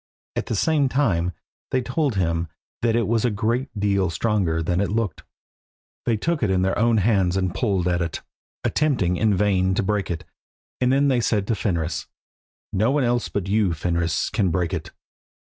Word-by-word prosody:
At - - -2
the 115 - -1
same 145 +4 +2
time 95 -11 +1 0.4
they 130 -1 0
told 135 0 0
him 85 -3 0 0.3
that 115 -1 +2
it 115 -1 +1
was 115 -1 +1
a 125 - +3
good 115 +5 -1
deal 100 -3 +1
stronger 85 -3 0
than 90 +3 0
it 100 - 0
looked. 110 -3 -1 0.9
They 115 -2 +2
took 165 +7 -1
it 110 - +1
in 95 -1 +2
their 95 +1 +1
own 115 +1 +3
hands 95 -3 +2
and 95 -2 0
pulled 95 -6 0
at 90 0 +1
it, 85 -2 -3 0.4
attempting 125 - +1
in 105 +2 +2
vain 95 -2 +2
to 105 - +1
break 105 0 -1
it, 85 -2 -3 0.6
and 125 0 +2
then 140 +2 +3
they 125 -3 +2
said 105 -3 +1
to 115 - +2
Fenris 85 -5 -2 0.7
"No 110 +5 +2
one 140 0 +2
else 120 -1 0
but 100 -3 -2
you, 100 -4 +2
Fenris, 85 0 -1
can 100 -5 +1
break 85 -1 -1
it." - - -3
100 Hz, 190 wpm, -23 LUFS, 90-115 Hz, 0.9 s, a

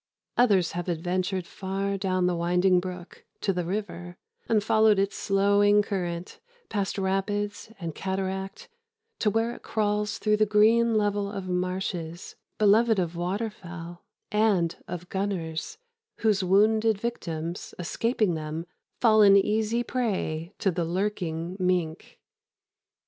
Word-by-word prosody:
Others 200 -8 +3
have 175 +1 -4
adventured 180 +2 -1
far 195 +2 -3
down 185 -2 0
the 180 -1 +1
winding 180 +2 +3
brook 180 -1 -8 0.2
to 195 - +1
the 180 -1 -1
river, 175 -1 -5 0.3
and 215 -3 +3
followed 220 -1 +4
its 195 0 0
slowing 205 +1 +3
current, 180 -3 -4 0.3
past 200 -2 -2
rapids 200 +2 -2
and 165 -3 -4
cataract, 190 +1 -4 0.5
to 215 - +2
where 225 +3 +1
it - - -11
crawls 210 -1 -1
through 210 -1 +2
the 215 0 +3
green 225 +2 +4
level 205 -1 0
of 195 -3 -5
marshes 180 -2 -3 0.2
beloved 215 +2 +4
of 175 -2 -1
water 195 +6 -2
fowl 175 -3 -10 0.3
and 205 -6 +2
of 175 0 -6
gunners, 190 - -3 0.4
whose 210 -4 +2
wounded 215 +3 +3
victims, 170 -7 -4
escaping 215 +2 0
them, 155 +1 -4 0.4
fall 220 -2 +6
an 200 -1 +8
easy 220 +4 +1
prey 190 -10 -2
to 195 - +1
the 175 0 -1
lurking 175 -1 -2
mink. 180 -3 -1
195 Hz, 130 wpm, -27 LUFS, 175-210 Hz, 0.5 s, an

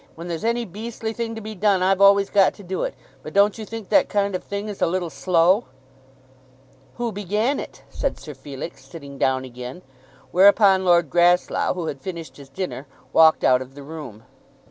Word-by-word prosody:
"When 170 +2 -8
there's 165 -2 -4
any 235 +1 0
beastly 220 +3 -6
thing 230 0 -4
to 225 - -7
be 215 +1 -7
done, 195 -2 +2
I've 195 +1 +2
always 200 0 +5
got 195 -2 +4
to 205 - -13
do 185 +1 -4
it. - - -3 0.3
But - - -9
don't 200 +2 +3
you 215 - -6
think 225 -3 -8
that - - +4
kind 200 -1 0
of 185 - -3
thing 200 +1 -5
is 205 -2 -7
a - - +3
little 175 -1 -2
slow?" 185 +5 +2 1.3
"Who 240 -1 -2
began 210 +7 -1
it?" - - -9
said 275 - -3
Sir 150 - -9
Felix, 135 +3 -9
sitting 140 -4 -11
down 130 0 +1
again. 125 +6 -9 0.5
Whereupon 195 0 +5
Lord 170 -5 +3
Grasslough, 175 +1 +2
who 175 -2 -4
had 140 -4 -5
finished 170 0 -7
his 140 -2 -13
dinner, 150 -3 -5 0.3
walked 160 -1 +5
out 130 0 +4
of 130 +1 -10
the 145 - -10
room. 140 -8 -9
185 Hz, 195 wpm, -22 LUFS, 160-205 Hz, 1.3 s, always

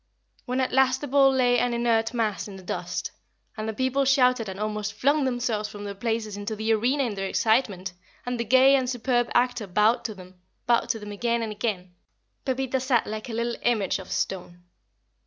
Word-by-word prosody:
When 250 +1 0
at 260 - 0
last 260 0 +3
the 290 - -4
bull 275 0 +5
lay 245 -2 +3
an 245 -1 0
inert 230 -1 +1
mass 220 -5 -1
in 200 - -9
the 190 - -11
dust, - - -4 0.4
and 215 -1 -4
the - - -3
people 260 +2 +1
shouted 255 -5 +3
and 190 +1 -7
almost 210 -1 -3
flung 285 +1 +2
themselves 240 -4 -1
from 205 0 -9
their 200 -1 -5
places 220 0 -2
into 205 +2 -4
the 220 +1 +1
arena 250 +6 +1
in 235 -4 -2
their 195 -1 -3
excitement, 205 -4 +1 0.3
and 245 -1 -3
the - - +1
gay 260 +4 +6
and 260 -2 0
superb 245 -1 0
actor 245 -3 +1
bowed 210 +5 +2
to 220 -2 -4
them 185 -1 -14 0.2
bowed 235 -1 +2
to - - +1
them 210 -1 -8
again 235 +3 -1
and 220 - -3
again 205 -4 -3 0.5
Pepita 265 0 -1
sat 255 -3 +1
like 215 +3 -6
a - - -5
little 235 +1 -2
image 220 -6 +1
of - - -10
stone. 175 -2 -3
230 Hz, 205 wpm, -26 LUFS, 210-255 Hz, 0.5 s, gay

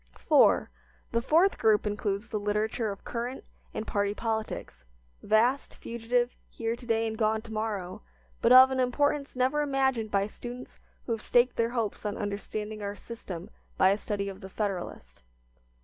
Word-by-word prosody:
IV. - - +4 0.5
The 230 - +1
fourth 330 +10 +3
group 215 -1 +4
includes 205 0 -2
the 215 - -2
literature 210 +2 -1
of 200 - -9
current 245 +2 -4 0.3
and 215 - -4
party 205 -1 0
politics, 220 - -3 0.4
vast, 235 +6 +2
fugitive, 240 +1 -1
here 230 0 -2
to 240 +1 -13
day 225 -1 +2
and 220 -1 -2
gone 220 0 +1
to 225 - -9
morrow, 210 -3 -3 0.4
but 230 - +4
of 260 +1 +9
an 260 - -1
importance 280 +3 +1
never 260 +4 +2
imagined 265 -6 +1
by 200 -1 +2
students 245 +4 -9 0.3
who - - -4
have 225 -1 -1
staked 245 +1 +3
their 230 0 +1
hopes 230 -4 -2
on 210 -1 -3
understanding 210 +1 -4
our 200 0 -4
system 200 -3 -8 0.3
by 185 - +6
a 200 - +2
study 200 -2 -3
of 195 +1 -7
"The 190 - -8
Federalist." 195 -3 -4
220 Hz, 165 wpm, -29 LUFS, 205-245 Hz, 0.5 s, of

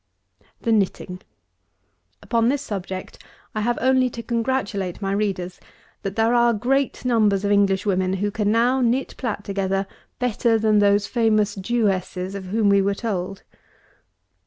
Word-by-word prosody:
233. - - -19
THE 225 -2 +4 0.3
KNITTING. 180 0 -10 1.0
Upon 230 -1 +1
this 285 +1 0
subject, 190 -2 -6 0.3
I 215 - -2
have 240 +2 0
only 260 0 +3
to 235 -1 -8
congratulate 230 -7 -2
my 195 -1 -2
readers 195 -3 -2 0.4
that 195 0 -4
there 225 +1 +2
are 235 -1 +4
great 265 +5 0
numbers 210 -5 +2
of 200 - +1
English 200 -1 +2
women 185 -2 +1
who 205 +2 -1
can 210 -1 0
now 245 +4 +2
knit, 250 +2 0
plat 220 -5 -3
together, 195 -1 -1 0.3
better 235 -1 +1
than 215 -1 +3
those 205 0 +3
famous 215 -3 +1
Jewesses 195 -3 -1
of 200 -1 -6
whom 210 +3 +1
we 200 0 +5
were 200 +1 0
told. 195 -3 -4
210 Hz, 155 wpm, -22 LUFS, 195-235 Hz, 1.0 s, we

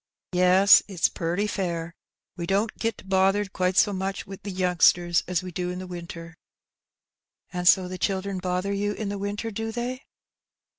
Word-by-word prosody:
"Yes, 185 +2 +6
it's 190 -5 +1
purty 175 +5 -2
fair; 170 -5 -3 0.4
we 170 -1 -5
don't 205 +4 0
git 225 -4 -3
bothered 195 +1 +2
quite 185 0 0
so 205 - +4
much 190 0 -3
wi' 195 0 -9
the 205 - -7
youngsters 180 -2 +3
as 180 -1 -1
we 185 - -7
do 180 +1 -3
in 180 - -4
the 185 - -6
winter." 170 -2 -9 1.2
"And 180 0 -2
so 185 0 +6
the 185 0 -7
children 195 -1 -1
bother 185 +2 -2
you 205 +1 -1
in 210 -1 -4
the 200 0 -4
winter, 205 +3 -3
do 225 +2 -4
they 245 +3 -4
190 Hz, 170 wpm, -25 LUFS, 180-200 Hz, 1.2 s, Yes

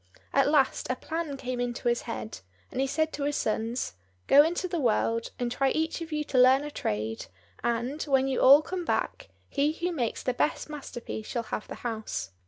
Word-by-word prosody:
At 275 0 +4
last 290 -3 +2
a 255 - +1
plan 320 -1 -4
came 255 -1 -4
into 245 0 -2
his 240 0 +2
head, 110 -3 -5 0.3
and 260 - -1
he 270 - +1
said 315 +3 0
to 290 - -3
his 290 0 0
sons, 225 - -1 0.3
"Go 285 - +8
into 345 +4 0
the 345 -2 -2
world, 230 -2 +1
and 245 -1 -2
try 270 +2 +2
each 320 +3 -1
of 330 -1 -6
you 300 0 -1
to 270 -3 0
learn 260 +2 +6
a 295 - -5
trade, 110 - -3 0.4
and, 240 +5 -1
when 270 -2 +2
you 265 - 0
all 280 +3 +8
come 360 +2 -4
back, - - -2 0.2
he 285 +1 +1
who 350 +2 -2
makes 245 -9 -2
the 255 - 0
best 300 +4 -1
masterpiece 240 -6 -6
shall 235 - -2
have 215 - -5
the - - -7
house." 220 - -3
265 Hz, 205 wpm, -28 LUFS, 235-300 Hz, 0.4 s, Go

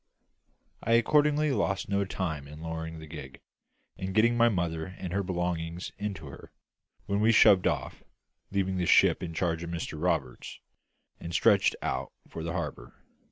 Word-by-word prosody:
I 115 - +1
accordingly 150 +5 +3
lost 95 -7 0
no 100 0 0
time 80 -7 -4
in 75 +1 -11
lowering 80 0 -5
the 80 - -9
gig, 70 -4 -9 0.6
and 95 +1 -4
getting 115 +2 +4
my 120 0 +5
mother 85 -5 -1
and 90 -2 -5
her 100 - +1
belongings 90 -2 -3
into 100 -6 -4
her; 70 - -11 0.5
when 100 -1 0
we 110 +2 +4
shoved 100 -3 +6
off - - -2 0.5
leaving 95 -1 -1
the 90 -2 0
ship - - +5
in 85 -2 -5
charge 85 -2 0
of 85 - -5
Mr 80 -2 -5
Roberts 90 -7 -2 0.6
and 85 0 -6
stretched - - +4
out 65 0 -2 0.2
for 80 - -7
the 85 +1 -3
harbour. 75 -8 -5
90 Hz, 160 wpm, -29 LUFS, 80-100 Hz, 0.6 s, shoved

